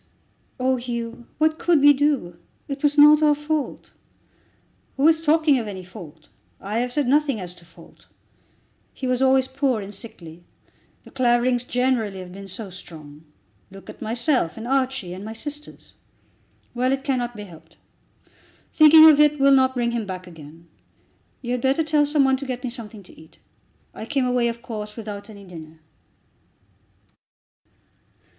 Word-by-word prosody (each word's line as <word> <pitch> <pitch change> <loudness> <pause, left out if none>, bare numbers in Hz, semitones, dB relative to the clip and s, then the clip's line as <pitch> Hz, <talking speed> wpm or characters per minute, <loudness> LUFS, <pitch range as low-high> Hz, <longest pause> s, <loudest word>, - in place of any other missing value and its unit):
"Oh, 260 0 +1
Hugh; 235 -1 -6
what 315 +1 +1
could 345 -3 +3
we 290 +1 +7
do? 270 - -1 0.3
It 275 -1 -6
was 295 0 +1
not 300 +1 +7
our 300 -1 +4
fault." 295 0 -4 1.0
"Who 280 +3 +4
is 320 0 +3
talking 310 -3 +3
of 225 - -5
any 190 -3 -7
fault? 165 -5 -13 0.3
I 210 +4 -3
have 245 +1 -2
said 285 0 -1
nothing 280 -3 +2
as 180 -2 -8
to 175 -1 -18
fault. 170 0 -19 0.9
He 265 - -6
was 255 0 0
always 265 0 +3
poor 265 -3 -1
and 200 0 -8
sickly. 175 -5 -12 0.6
The - - -16
Claverings, 245 -1 +1
generally, 245 -6 -1
have 185 -1 -9
been 195 +1 -10
so 195 +1 -8
strong. 155 -4 -13 0.4
Look 195 0 -12
at - - -19
myself, 235 - -1
and 225 +1 -7
Archie, 260 -8 -1
and 185 +2 -8
my 220 +1 -7
sisters. 295 +6 -10 0.8
Well, 250 +1 0
it 270 0 -2
cannot 245 -4 -2
be 210 - -8
helped. 165 -3 -16 1.0
Thinking 315 +1 +8
of 300 -2 +6
it 300 -1 +4
will 275 0 +5
not 260 -1 +3
bring 240 -1 0
him 230 -3 -3
back 185 -1 -6
again. 165 -1 -14 0.8
You 240 - -4
had 250 -1 -1
better 270 +5 +1
tell 300 -1 +2
some 295 -1 +2
one 265 0 +2
to 275 - -7
get 250 0 -5
me 250 - -3
something 220 -4 -10
to - - -18
eat. 160 - -20 0.6
I 220 - -8
came 275 -1 0
away, 250 -1 +1
of 235 0 -5
course, 210 -2 -7
without 210 -2 -8
any 200 -2 -12
dinner." 160 -3 -12
245 Hz, 165 wpm, -22 LUFS, 195-275 Hz, 1.0 s, Thinking